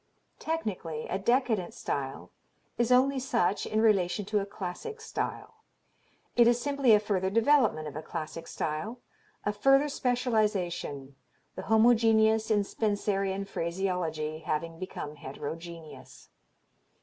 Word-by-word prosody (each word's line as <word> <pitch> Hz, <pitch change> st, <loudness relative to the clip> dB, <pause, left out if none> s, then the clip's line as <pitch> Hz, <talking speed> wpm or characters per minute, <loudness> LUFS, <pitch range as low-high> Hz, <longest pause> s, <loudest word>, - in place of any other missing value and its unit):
"Technically 195 Hz, -, -3 dB
a 190 Hz, -, -1 dB
decadent 230 Hz, -4 st, +1 dB
style 135 Hz, -11 st, -4 dB, 0.4 s
is 240 Hz, +1 st, +1 dB
only 265 Hz, +2 st, +4 dB
such 235 Hz, -7 st, 0 dB
in 215 Hz, -, 0 dB
relation 200 Hz, -3 st, +2 dB
to 210 Hz, +1 st, +1 dB
a 200 Hz, -, -4 dB
classic 205 Hz, -, -6 dB
style. 445 Hz, 0 st, -5 dB, 0.8 s
It 235 Hz, -1 st, +6 dB
is 240 Hz, 0 st, +4 dB
simply 280 Hz, -2 st, +3 dB
a 210 Hz, -, +7 dB
further 195 Hz, -3 st, 0 dB
development 230 Hz, -, +3 dB
of 145 Hz, -, -8 dB
a 155 Hz, -, -4 dB
classic 160 Hz, +1 st, -6 dB
style, 205 Hz, +11 st, -3 dB, 0.5 s
a 205 Hz, -, +1 dB
further 270 Hz, +7 st, +4 dB
specialization, 210 Hz, -, -1 dB, 0.4 s
the -, -, -6 dB
homogeneous 220 Hz, -1 st, +4 dB
in 210 Hz, -2 st, +3 dB
Spencerian 200 Hz, -2 st, -1 dB
phraseology 170 Hz, -4 st, -2 dB
having 165 Hz, +1 st, -3 dB
become 150 Hz, -5 st, -6 dB
heterogeneous. 150 Hz, -2 st, -9 dB
200 Hz, 120 wpm, -29 LUFS, 165-235 Hz, 0.8 s, a